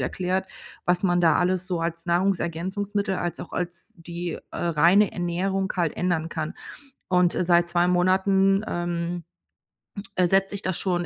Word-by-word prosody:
erklärt, 185 +1 -1 0.4
was 180 0 +2
man 175 -1 +3
da 165 -2 +4
alles 185 +1 +1
so 180 -3 -2
als 165 +1 -3
Nahrungsergänzungsmittel 190 +3 -1
als 175 -1 -3
auch - - -9
als 175 +5 -5
die, 170 0 -5 0.2
äh, - - -6
reine 175 +5 +4
Ernährung 190 +2 -1
halt 170 -4 0
ändern 175 -3 0
kann 160 -2 -4 0.5
und, 180 -1 +3
äh, - - +1
seit 175 0 +3
2 175 0 +2
Monaten, 190 +2 +3
ähm, 175 0 -3 1.0
setze 195 +2 +3
ich 200 - -2
das 185 -2 0
schon 175 -2 0
175 Hz, 150 wpm, -25 LUFS, 170-190 Hz, 1.0 s, da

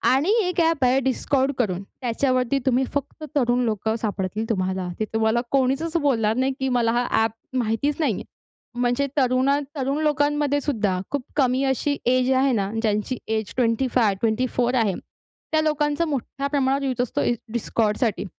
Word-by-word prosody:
आणि 290 +8 +1
एक 360 -1 -1
ॲप 325 -4 +2
आहे 255 +2 +4
Discord 270 +2 0
करून, 190 -7 0 0.2
त्याच्यावरती 255 +2 +1
तुम्ही 260 0 +3
फक्त 285 +2 -4
तरुण 250 -2 +2
लोकं 220 0 -1
सापडतील 210 +1 -2
तुम्हाला. 185 -3 -1
ते 215 - 0
तुम्हाला 220 +1 +2
कोणीचच 275 +5 +1
बोलणार 225 -7 +2
नाही 260 +2 +1
की 265 0 0
मला 230 -2 +2
हा 240 +1 +1 0.2
ॲप 225 +3 -4
माहितीच 245 +5 0
नाही 315 - +2
आहे. - - -5 0.6
म्हणजे 245 +3 +1
तरुणा 260 +1 +3 0.2
तरुण 275 0 -1
लोकांमधेसुद्धा 290 -8 +1
खूप 285 -1 -1
कमी 260 -2 +2
अशी 270 +2 0
एज 255 +1 +3
आहे 270 0 +3
ना, 200 -4 0
ज्यांची 215 +3 -1 0.2
एज 220 -2 -3
25 230 -3 +2
24 240 +2 +1
आहे 220 -6 +2 0.6
त्या 315 0 +3
लोकांचं 300 +1 0
मोठ्या 275 -1 -3
प्रमाणावर 275 -1 +1
युज 255 -3 -1
असतो 250 - -2
इ - - +2 0.2
Discordसाठी. 220 -1 0
255 Hz, 155 wpm, -23 LUFS, 225-280 Hz, 0.6 s, आहे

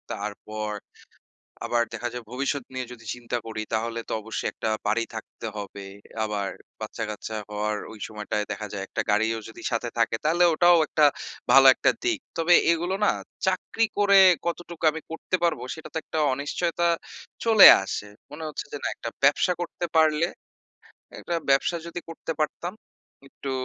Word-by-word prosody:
তারপর, 105 +1 -5 0.9
আবার 120 -1 +2
দেখা 120 +1 -3
যায় 125 -1 -6
ভবিষ্যৎ 140 +1 -1
নিয়ে 130 -1 -3
যদি 115 - -14
চিন্তা 120 0 -3
করি 110 -1 -4
তাহলে 115 +1 -1
তো - - -2
অবশ্যই 110 +1 -3
একটা 110 - -3 0.2
বাড়ি 115 +2 +2
থাকতে 110 +1 -7
হবে। 100 -1 -7 0.4
আবার 100 -2 -2 0.3
বাচ্চা-কাচ্চা 110 0 -5
হওয়ার 105 0 -2
ওই 110 - -11
সময়টায় 105 -1 -3
দেখা 105 +1 -4
যায় 95 -1 -4
একটা - - -2
গাড়িও 110 +2 +1
যদি - - -12
সাথে 115 +1 -1
থাকে 115 - +2
তাহলে 170 +3 +3
ওটাও 175 +1 +6
একটা 155 -1 +3 0.5
ভালো 135 0 +8
একটা - - +3
দিক। 345 -5 +1 0.2
তবে 165 +1 +4 0.2
এগুলো 175 +3 0
না - - +5 0.4
চাকরি 205 +4 +1
করে 200 -1 +6 0.3
কতটুকু 170 -1 -5
আমি 160 +1 -6
করতে 165 +3 -2
পারব 170 -3 +2 0.2
সেটা 160 - -10
তো - - -2
একটা 160 - -3
অনিশ্চয়তা 170 +5 -1 0.6
চলে 220 -4 +10 0.2
আসে। 105 +1 -4 0.2
মনে 160 +2 -8
হচ্ছে 150 - -5
যে - - -2
না - - +1
একটা 115 - -5
ব্যবসা 145 +5 +4
করতে 175 0 -3
পারলে 155 +1 +4 0.9
একটা 175 - -4 0.2
ব্যবসা 140 +5 +3
যদি 170 +1 -5
করতে 165 0 -5
পারতাম। 170 +4 -2 0.6
একটু 135 - -7
135 Hz, 160 wpm, -25 LUFS, 110-170 Hz, 0.9 s, চলে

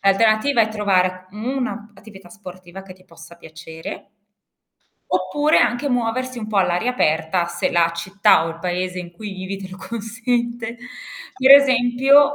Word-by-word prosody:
l'alternativa 215 +6 +3
è 220 - 0
trovare 185 -3 0
u - - -13
una 245 -2 -4
p - - -21
attività 195 -4 -14
sportiva 185 -2 -12
che 190 -1 -12
ti 185 0 -22
possa 170 -1 -15
piacere 160 +1 -10 1.0
oppure 185 - +1
anche 245 +4 +1
muoversi 250 +1 -2
un 215 -2 -6
po' 215 - -3
all'aria 190 +5 +1
aperta, 160 -4 0
se 175 0 -2
la 170 -1 +2
città 190 0 +2
o - - -3
il 165 0 -8
paese 180 +1 -3
in 175 -1 -8
cui 205 +3 -8
vivi 190 +1 -6
te 195 -1 -9
lo 185 - -9
consente. 235 +2 -3 0.6
Per 260 +1 +3
esempio: 275 +1 +5
200 Hz, 160 wpm, -20 LUFS, 180-240 Hz, 1.0 s, esempio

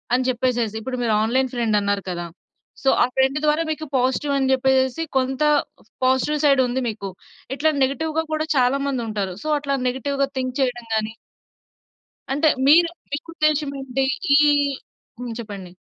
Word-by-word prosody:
అని 255 0 0
చెప్పేసేసి. 240 -3 0
ఇప్పుడు 255 +2 -4
మీరు 225 -2 +1
ఆన్‌లైన్ 260 +3 +1
ఫ్రెండన్నారు 205 -4 0
కదా! 175 -1 -4 0.6
సో, 270 - +4
ఆ - - +5
ఫ్రెండ్ 265 +2 +2
ద్వారా 300 +2 +2
మీకు 310 0 -4
పాజిటివని 265 +1 +1
చెప్పేసేసి 265 +2 +2 0.2
కొంత 265 +2 -1 0.6
పాజిటివ్ 260 +4 +2
సైడుంది 260 -2 +3
మీకు. 200 -2 -6 0.5
ఇట్లా 315 +2 +2
నెగిటివ్‌గా 315 +4 -1
కూడా 310 0 0
చాలా 255 +2 +3
మందుంటారు. 215 -8 -3
సో, - - -5
అట్లా 280 -1 -1
నెగెటివ్‌‌గా 275 +2 -1
థింక్ 255 0 -2
చెయడం 245 -3 -1
గానీ 220 0 -1 1.2
అంటే 300 +2 +3 0.2
మీరు 335 +4 +6 0.2
మీకు 295 +3 -4
ఉద్దేశం 305 -2 +1
ఏంటి? 265 0 -1 0.3
ఈ - - +7 0.8
హ్మ్. 245 -2 -5
చెప్పండి. 200 -5 -8
260 Hz, 140 wpm, -22 LUFS, 235-280 Hz, 1.2 s, ఈ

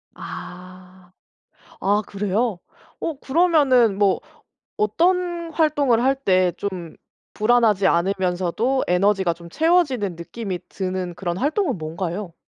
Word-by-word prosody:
아. 180 0 -10 0.7
아 205 +2 +2
그래요? 205 0 -1 0.4
어 315 -5 -4
그러면은 270 - +3
뭐 200 -2 +3 0.6
어떤 345 - 0
활동을 285 -7 +2
할 270 +1 +3
때 185 -8 +2
좀 180 -5 -5 0.4
불안하지 215 -3 +3
않으면서도 190 +7 0
에너지가 190 0 +2
좀 170 0 -13
채워지는 275 - +1
느낌이 185 +2 -5
드는 185 -2 -4
그런 175 -2 -3
활동은 295 - 0
뭔가요? 170 +3 -4
200 Hz, 240 characters per minute, -22 LUFS, 180-265 Hz, 0.7 s, 그러면은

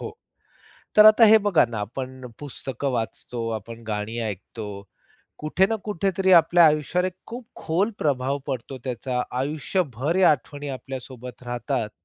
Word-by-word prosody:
हो. - - -5 0.9
तर 215 0 +9
आता 215 +2 +8
हे 220 +1 +8
बघा 185 -6 +5
ना 115 -2 -5
आपण 130 +4 -6
पुस्तकं 135 -1 -4
वाचतो. 115 0 -4
आपण 115 +1 -6
गाणी 105 +2 -3
ऐकतो. 105 +2 -7 0.7
कुठे 155 +5 +2
ना 225 - +1
कुठेतरी 190 -1 0
आपल्या 170 0 +6
आयुष्यावर 155 +4 +2
एक 185 - -6
खूप 235 0 -8
खोल 190 +8 0
प्रभाव 140 -1 0
पडतो 130 0 -4
त्याचा. 125 0 -2 0.2
आयुष्यभर 145 - -1
या 190 -4 +6
आठवणी 145 0 -4
आपल्या 130 0 -6
सोबत 125 0 -11
राहतात. 120 -1 -2
135 Hz, 145 wpm, -24 LUFS, 120-175 Hz, 0.9 s, तर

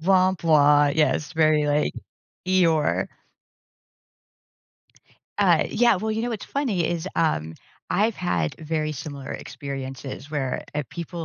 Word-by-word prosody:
Yes, 155 -4 +3
very 155 -2 +3
like 145 +1 +1 0.5
Eeyore. 170 -5 +2 2.3
Uh, - - +4
yeah, 240 -3 +4
well, 215 +4 -2
you 220 +1 -1
know 240 - -2
what's 220 -3 -4
funny 225 - -1
is, 170 0 -2
um, 80 - 0 0.4
I've 210 +3 +1
had 85 - -1
very 155 -1 -2
similar 145 -2 -7
experiences 135 0 -7
where, 135 -4 -2
uh, 150 - 0
people, 170 0 -6
155 Hz, 110 wpm, -24 LUFS, 145-185 Hz, 2.3 s, Uh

